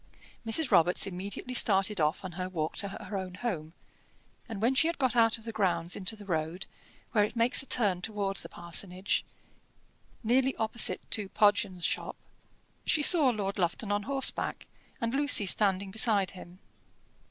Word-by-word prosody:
Mrs. 250 Hz, +6 st, +1 dB
Robarts 175 Hz, +2 st, +5 dB
immediately 195 Hz, +6 st, -5 dB
started 195 Hz, -5 st, +2 dB
off 155 Hz, +6 st, 0 dB
on 185 Hz, -, -6 dB
her 185 Hz, +2 st, -5 dB
walk 160 Hz, -4 st, -3 dB
to 200 Hz, -, 0 dB
her 200 Hz, +1 st, -8 dB
own 185 Hz, -2 st, -5 dB
home, 175 Hz, -8 st, -4 dB, 0.8 s
and 220 Hz, -3 st, -6 dB
when 235 Hz, +5 st, +2 dB
she 300 Hz, +5 st, +3 dB
had 335 Hz, -, -2 dB
got 260 Hz, -3 st, 0 dB
out 225 Hz, -1 st, +4 dB
of 225 Hz, -, -17 dB
the 230 Hz, -, -6 dB
grounds 175 Hz, -5 st, -1 dB
into 200 Hz, +3 st, -2 dB
the 210 Hz, -1 st, -13 dB
road, 165 Hz, 0 st, -3 dB, 0.5 s
where 210 Hz, -4 st, +3 dB
it 210 Hz, -, -3 dB
makes 230 Hz, +1 st, +4 dB
a 270 Hz, -, -7 dB
turn 200 Hz, -9 st, +1 dB
towards 200 Hz, -1 st, -2 dB
the -, -, -8 dB
parsonage, 180 Hz, +2 st, -2 dB, 1.0 s
nearly 260 Hz, +4 st, +2 dB
opposite 220 Hz, +1 st, +1 dB
to 205 Hz, -3 st, -1 dB
Podgens' 200 Hz, -4 st, +1 dB
shop, -, -, -2 dB, 0.7 s
she 300 Hz, -, +1 dB
saw 305 Hz, -4 st, +5 dB
Lord 205 Hz, -4 st, -3 dB
Lufton 185 Hz, +4 st, -1 dB
on 205 Hz, 0 st, 0 dB
horseback, 275 Hz, -1 st, 0 dB, 0.3 s
and 230 Hz, +1 st, -2 dB
Lucy 285 Hz, -6 st, +4 dB
standing 195 Hz, -1 st, +1 dB
beside 210 Hz, -2 st, +2 dB
him. 180 Hz, -1 st, -13 dB
205 Hz, 165 wpm, -29 LUFS, 185-230 Hz, 1.0 s, Robarts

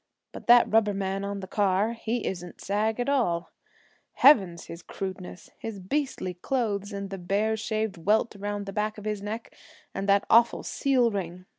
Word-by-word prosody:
But -, -, -11 dB
that 240 Hz, 0 st, +7 dB
rubber 210 Hz, -2 st, +2 dB
man 195 Hz, 0 st, -2 dB
on 200 Hz, 0 st, -4 dB
the 190 Hz, -, -7 dB
car 205 Hz, +3 st, +1 dB
he 230 Hz, 0 st, -3 dB
isn't 175 Hz, -2 st, -5 dB
sag 215 Hz, +3 st, -1 dB
at 245 Hz, -, -1 dB
all. 225 Hz, -12 st, 0 dB, 0.6 s
Heavens, 195 Hz, -, +5 dB
his 170 Hz, +1 st, -9 dB
crudeness! 185 Hz, -1 st, -7 dB
His 220 Hz, -3 st, -6 dB
beastly 195 Hz, -2 st, -2 dB
clothes, 205 Hz, 0 st, -2 dB
and 200 Hz, -1 st, -5 dB
the 195 Hz, -, -5 dB
bare 205 Hz, +5 st, 0 dB
shaved 220 Hz, -2 st, -2 dB
welt 210 Hz, +6 st, +1 dB
around 205 Hz, 0 st, -4 dB
the 195 Hz, -, -7 dB
back 215 Hz, 0 st, -1 dB
of 210 Hz, -, -9 dB
his 210 Hz, -2 st, -2 dB
neck, 215 Hz, +3 st, -6 dB, 0.4 s
and 195 Hz, +1 st, -3 dB
that 200 Hz, 0 st, +4 dB
awful 235 Hz, +1 st, +4 dB
seal 255 Hz, -4 st, +1 dB
ring! 185 Hz, -2 st, -5 dB
205 Hz, 175 wpm, -27 LUFS, 195-220 Hz, 0.6 s, that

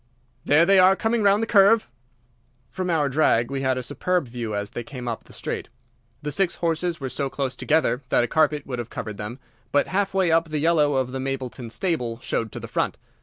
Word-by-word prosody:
"There 155 Hz, +4 st, +5 dB
they 195 Hz, +1 st, +5 dB
are, 185 Hz, +1 st, +6 dB
coming 225 Hz, +3 st, 0 dB
round 205 Hz, +1 st, +4 dB
the -, -, +1 dB
curve!" 215 Hz, +1 st, +5 dB, 0.8 s
From 185 Hz, +6 st, -3 dB
our 155 Hz, -4 st, +2 dB
drag 125 Hz, -4 st, +2 dB
we 135 Hz, -1 st, -2 dB
had 130 Hz, -1 st, +1 dB
a 130 Hz, -, -3 dB
superb 175 Hz, +4 st, -1 dB
view 115 Hz, -3 st, -4 dB
as 100 Hz, 0 st, -3 dB
they 120 Hz, -, -5 dB
came 125 Hz, -1 st, -8 dB
up 115 Hz, -2 st, -4 dB
the -, -, -17 dB
straight. -, -, -5 dB, 0.5 s
The 150 Hz, -, -3 dB
six 180 Hz, +3 st, +1 dB
horses 165 Hz, 0 st, -1 dB
were 135 Hz, -, -4 dB
so 135 Hz, +1 st, -2 dB
close 135 Hz, -1 st, -3 dB
together 145 Hz, -5 st, +1 dB
that -, -, +3 dB
a -, -, 0 dB
carpet 150 Hz, 0 st, +2 dB
could 125 Hz, -2 st, -4 dB
have 120 Hz, -1 st, -5 dB
covered 105 Hz, -2 st, -6 dB
them, 105 Hz, +4 st, -6 dB, 0.3 s
but 145 Hz, -, +2 dB
half 195 Hz, 0 st, 0 dB
way 185 Hz, -3 st, +3 dB
up 165 Hz, 0 st, +2 dB
the 155 Hz, -, -2 dB
yellow 150 Hz, -2 st, +3 dB
of 130 Hz, -1 st, 0 dB
the 130 Hz, -, -4 dB
Mapleton 130 Hz, -3 st, -4 dB
stable 120 Hz, -6 st, -2 dB
showed 115 Hz, -2 st, -2 dB
to -, -, -7 dB
the -, -, -7 dB
front. -, -, -1 dB
145 Hz, 220 wpm, -24 LUFS, 125-175 Hz, 0.8 s, are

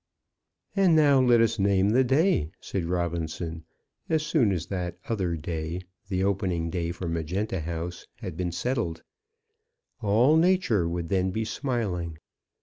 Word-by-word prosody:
"And 190 Hz, -4 st, +5 dB
now 145 Hz, -4 st, +5 dB
let 120 Hz, -2 st, +5 dB
us 115 Hz, -1 st, +2 dB
name 100 Hz, 0 st, +3 dB
the 130 Hz, +4 st, +4 dB
day," 135 Hz, -, +2 dB
said 95 Hz, -4 st, -3 dB
Robinson, 85 Hz, -1 st, -3 dB, 0.4 s
as 155 Hz, -1 st, +1 dB
soon 145 Hz, -9 st, +3 dB
as 85 Hz, -3 st, -2 dB
that 90 Hz, -2 st, -4 dB
other 95 Hz, -7 st, -1 dB
day, 80 Hz, +2 st, -4 dB, 0.3 s
the 95 Hz, -2 st, 0 dB
opening 90 Hz, -4 st, 0 dB
day 85 Hz, -2 st, -2 dB
for 90 Hz, 0 st, -5 dB
Magenta 85 Hz, +5 st, -2 dB
House, 85 Hz, +2 st, -5 dB
had 95 Hz, -8 st, -7 dB
been 90 Hz, 0 st, -2 dB
settled. 90 Hz, -2 st, -2 dB, 1.0 s
All 120 Hz, +9 st, +4 dB
nature 160 Hz, -, +3 dB
would 85 Hz, -1 st, -3 dB
then 95 Hz, 0 st, +1 dB
be 110 Hz, +4 st, -2 dB
smiling. 105 Hz, -, -2 dB
95 Hz, 145 wpm, -27 LUFS, 85-120 Hz, 1.0 s, And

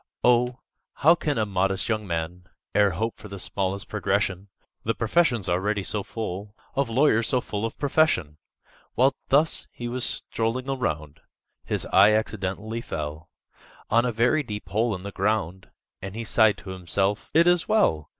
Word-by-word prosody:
"O, 125 Hz, 0 st, +3 dB, 0.4 s
how 160 Hz, +4 st, +6 dB
can 150 Hz, -5 st, -2 dB
a 110 Hz, -, +2 dB
modest 95 Hz, 0 st, 0 dB
young 110 Hz, -2 st, -1 dB
man 85 Hz, +1 st, -4 dB, 0.3 s
E'er 105 Hz, -1 st, +5 dB
hope 110 Hz, +6 st, -3 dB
for 105 Hz, -, -10 dB
the 100 Hz, -1 st, -8 dB
smallest 95 Hz, +1 st, -2 dB
progression,— 95 Hz, +1 st, -1 dB, 0.4 s
The 115 Hz, -, 0 dB
profession's 120 Hz, -, +1 dB
already 100 Hz, +3 st, 0 dB
so 105 Hz, +2 st, -1 dB
full 100 Hz, -1 st, -6 dB, 0.2 s
Of 140 Hz, -2 st, 0 dB
lawyers 115 Hz, -2 st, +3 dB
so 130 Hz, -, +3 dB
full 105 Hz, -2 st, -3 dB
of -, -, -11 dB
profession!" 135 Hz, -, +1 dB, 0.6 s
While 130 Hz, +3 st, +4 dB, 0.2 s
thus 150 Hz, +4 st, +3 dB
he 120 Hz, -, -6 dB
was 125 Hz, +1 st, -2 dB
strolling 115 Hz, +4 st, -1 dB
around, 80 Hz, -, -3 dB, 0.5 s
His -, -, -2 dB
eye 100 Hz, +3 st, +7 dB
accidentally 110 Hz, +1 st, -2 dB
fell 75 Hz, -4 st, -6 dB, 0.6 s
On 115 Hz, +2 st, +4 dB
a 125 Hz, -, 0 dB
very 120 Hz, +7 st, +2 dB
deep 105 Hz, -6 st, -7 dB
hole 110 Hz, +1 st, +1 dB
in 90 Hz, -, -9 dB
the 100 Hz, -, -6 dB
ground, 95 Hz, -3 st, -1 dB, 0.3 s
And 95 Hz, +1 st, -7 dB
he 115 Hz, -, -4 dB
sighed 110 Hz, -2 st, +3 dB
to 95 Hz, +1 st, -9 dB
himself, 95 Hz, +3 st, -1 dB
"It 165 Hz, +1 st, +6 dB
is 175 Hz, -1 st, +3 dB
well!" 80 Hz, -, +2 dB
105 Hz, 165 wpm, -25 LUFS, 95-120 Hz, 0.6 s, eye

